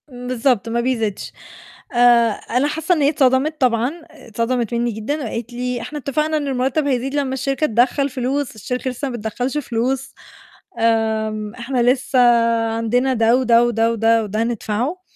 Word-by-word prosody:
امم، 250 -1 -9
بالضبط، 250 -2 0
ما 235 +1 0
بيزيدش 225 -5 -2 0.6
آآ 240 -1 +5
أنا 250 +6 -1
حاسة 320 +4 0
إن 310 - -1
هي 285 - +4
اتصدمت 280 +2 +1
طبعًا، 245 0 +2 0.2
اتصدمت 230 +1 -3
مِنّي 235 0 0
جدًا، 250 +8 -3
وقالت 235 +1 -5
لي: 250 0 -3
"إحنا 300 - -6
اتفقنا 305 +3 -1
إن 290 -2 -3
المرتب 270 +3 0
هيزيد 265 0 -1
لمّا 275 -2 -1
الشركة 275 +3 -1
تدخّل 250 +4 +2
فلوس، 260 0 -2
الشركة 250 +5 -4
لسه 270 +3 -4
ما 245 - -5
بتدخّلش 245 +5 -3
فلوس، 255 0 -2 0.7
آمم 220 -1 0
إحنا 250 +1 -2
لسه 255 +1 +2 0.6
عندنا 245 +4 +1
ده 230 0 +3
وده 240 -2 +4
وده 230 -1 +1
وده 225 0 +2
وده 215 +2 -2
ندفعه." 240 - -2
245 Hz, 160 wpm, -20 LUFS, 230-270 Hz, 0.7 s, آآ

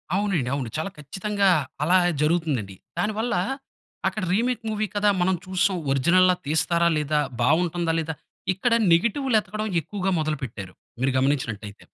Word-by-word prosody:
అవునండి. 190 -11 0
అవును. 130 -5 -3
చాలా 160 +5 -2
ఖచ్చితంగా, 195 +7 0 0.3
అలా 180 +4 +4 0.2
జరుగుతుందండి. 150 - 0 0.2
దానివల్ల, 215 +1 0 0.7
అక్కడ 215 - -2
రీమేక్ 235 +2 0
మూవీ 215 0 -1
కదా 205 0 +3
మనం 185 +1 +2
చూసాం, 185 0 +1
ఒరిజినల్‌గా 180 +7 +4
తీస్తారా 165 +3 +2
లేదా, 150 0 +1 0.2
బాగుంటుందా 165 +4 +2
లేదా, 160 0 -3 0.4
ఇక్కడ 230 +6 0 0.2
నెగెటివ్‌లు 235 +8 +2
ఎతకడం 215 +1 -4
ఎక్కువగా 195 +3 -3
మొదలు 155 -1 -1
పెట్టారు. 100 -6 -7 0.3
మీరు 135 +1 +1
గమనించినట్లయితే. 115 -7 -1
175 Hz, 130 wpm, -24 LUFS, 145-205 Hz, 0.7 s, అలా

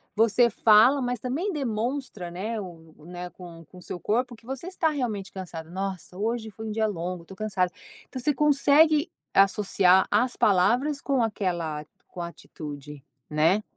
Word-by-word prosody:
você 225 +2 +4
fala, 230 +6 +5
mas 245 -1 -1
também 285 - -2
demonstra 245 - -3
né, 215 +6 -3
o 165 -5 -10
né 180 +1 -7
com 170 -2 -11
com 180 +4 -15
seu 175 - -6
corpo 240 +6 -1
que 225 - -21
você 265 +5 -6
está 360 -3 0
realmente 235 -10 -3
cansada. 170 -4 -7
"Nossa 185 -1 -5
hoje 220 +2 -2
foi 220 +1 -7
dia 220 0 +1
longo, 180 -3 -4
tô 190 - -12
cansada". 190 -3 -1 0.4
Então 260 - -6
você 290 +4 +1
consegue 300 +2 +4 0.3
associar 195 -1 +4
as 245 +4 +2
palavras 235 +10 +3
com 275 -3 0
aquela 175 -8 -2 0.2
com 175 - -8
atitude, 150 -4 -8 0.2
né? 160 +7 +2
210 Hz, 155 wpm, -26 LUFS, 180-250 Hz, 0.4 s, fala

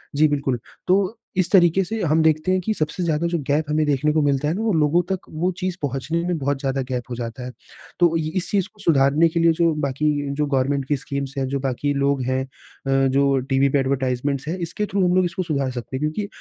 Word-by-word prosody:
जी, 155 +2 +5
बिल्कुल। 140 -4 -1 0.3
तो 195 +4 +2 0.2
इस 180 -1 +2
तरीके 185 0 +5
से 220 +4 -4
हम 160 0 +3
देखते 155 +3 +2
हैं 185 - +2
कि 215 +4 -1
सबसे 155 +1 -2
ज़्यादा 165 0 0
जो 170 0 -1
गैप 150 +2 +1
हमें 155 0 +2
देखने 145 +1 +1
को 155 - +2
मिलता 145 0 +1
है 155 - +1
वो 220 +2 0
लोगों 155 +2 +3
तक 190 - 0
वो 170 +4 -1
चीज़ 185 -1 -2
पहुँचने 145 +4 -2
में 175 -2 0
बहुत 140 -1 -1
ज़्यादा 135 -1 -1
गैप 125 -1 -2
हो 120 - -4
जाता 120 +1 -6
है। 125 - -6 0.5
तो 175 - +6
अ, 165 0 0
ये 155 -1 -2
इस 185 - -1
चीज़ 195 -3 +1
को 210 - -25
सुधारने 145 +1 +4
के 170 +1 -1
लिए 165 0 +5
जो 165 -2 +3
बाकी 140 +3 0 0.3
जो 150 0 0
गवर्नमेंट 140 0 0
की 145 - +1
स्कीम्स 140 0 -5
हैं 135 - 0
जो 140 +1 -2
बाकी 135 +2 -1
लोग 140 -1 +1
हैं। 130 +1 0
अ, - - -21 0.7
जो 140 0 +3
टीवी 135 +1 +3
पे 140 - +2
एडवर्टाइजमेंट्स 135 +1 -1
हैं 175 - -2
इसके 175 +4 -3
थ्रू 195 -2 0
हम 180 - +2
लोग 185 0 +4
इसको 180 +2 -2
सुधार 140 -6 -1
सकते 125 +1 -6
हैं। - - -5
क्योंकि 155 +7 -2
150 Hz, 245 wpm, -22 LUFS, 135-170 Hz, 0.7 s, तो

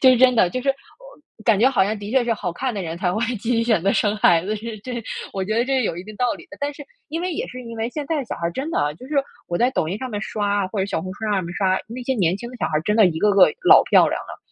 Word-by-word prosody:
这 260 - +8
是 255 - +5
真 255 -1 +6
的， 185 -6 +3
就 255 - -3
是 275 - -3
我 300 - -13
感 215 -4 +4
觉 250 +4 +5
好 255 -7 +2
像 210 +1 -2
的 205 0 -7
确 260 -2 +3
是 235 - +1
好 185 -5 -3
看 255 +8 -2
的 200 -3 -4
人 165 0 -5
才 180 0 0
会 215 - -2 0.2
继 225 +4 -4
续 230 -1 +2
选 220 -8 +2
择 195 - +2
生 210 0 +1
孩 170 -4 +4
子， 215 - -1
是 220 +1 -6
这 240 +2 -6 0.3
我 190 -1 -2
觉 215 +3 -2
得 235 - +3
这 270 +1 +1
是 255 - +1
有 170 - -2
一 175 - -7
定 215 +1 -10
道 245 +3 +1
理 - - -13
的。 300 - -12
但 290 +1 -1
是 290 0 -10 0.2
因 325 +3 -3
为， 360 0 -2
也 - - -3
是 255 0 -8
因 230 -1 -8
为 225 +1 -2
现 290 +1 -5
在 325 - -1
的 270 - -3
小 - - -5
孩 170 - -2
真 275 - -4
的 - - -1
啊， 145 0 +1
就 210 - -13
是 305 - -4 0.3
我 175 - -1
在 250 +2 +2
抖 155 - 0
音 195 +5 -3
上 260 - -5
面 210 -3 -4
刷 205 -2 -1
啊， 185 - -2
或 205 - -5
者 195 - +1
小 - - -2
红 185 0 -5
书 220 - -7
上 195 - +1
面 170 0 -6
刷， 190 0 +1
那 240 +3 -7
些 265 - 0
年 185 -5 +1
轻 235 +3 -7
的 250 - -10
小 - - 0
孩 155 -1 0
真 210 +1 +1
的 215 -4 +7
一 160 -2 -1
个 210 +2 +3
个 195 -2 +7 0.2
老 - - +9
漂 - - +7
亮 - - -2
了。 - - -10
220 Hz, 370 characters per minute, -22 LUFS, 195-255 Hz, 0.3 s, 老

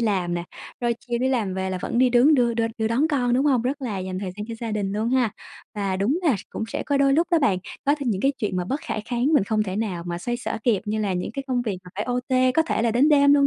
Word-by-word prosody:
làm 190 -6 0
nè, 170 0 -3 0.4
rồi 240 -1 +1
chiều 240 -1 -3
đi 260 - +1
làm 220 -8 0
về 190 0 -2
là 185 - -2
vẫn 235 - -2
đi 255 -1 +5
đứng 250 +6 +5
đưa 240 -3 +2
đưa 230 0 +1
đưa 220 0 +1
đón 260 +8 +2
con, 250 -5 +1
đúng 265 +4 +2
hông? 255 -5 +3
Rất 270 +3 -2
là 215 -7 -3
dành 185 0 -4
thời 190 -2 -4
gian 210 - -5
cho 230 - -4
gia 230 -2 -3
đình 200 -2 -1
luôn 215 +2 -1
ha. 250 -4 +2 0.4
Và 195 -2 -1
đúng 225 - +1
là 295 - +3
s - - -8
cũng - - -3
sẽ - - -3
có 285 - +1
đôi 275 0 +4
lúc 330 +4 +3
đó 335 - +4
bạn, 210 -11 +2 0.3
có 285 +1 +4
thêm 270 -4 -1
những 195 -3 -1
cái 275 +5 +2
chuyện 205 -4 -2
mà 180 - -1
bất 270 +11 -2
khả - - -4
kháng 245 +1 -1
mình 290 -10 +4
không 215 +1 +1
thể 190 -2 -4
nào 200 -6 -2
mà 175 0 -3
xoay 240 +6 -2
xở 245 - -4
kịp, 225 -6 +2
như 215 +1 -2
là 200 -3 0
những 180 0 -2
cái 275 - -4
công 250 -2 0
việc 205 -6 -3
mà 180 - -12
phải 205 +2 -2
OT, 255 +1 +1
có 320 - +4
thể 320 - -1
là 235 - +2
đến 250 +6 +4
đêm 285 -1 +6
luôn, 280 -1 +5
235 Hz, 315 wpm, -24 LUFS, 200-260 Hz, 0.4 s, đêm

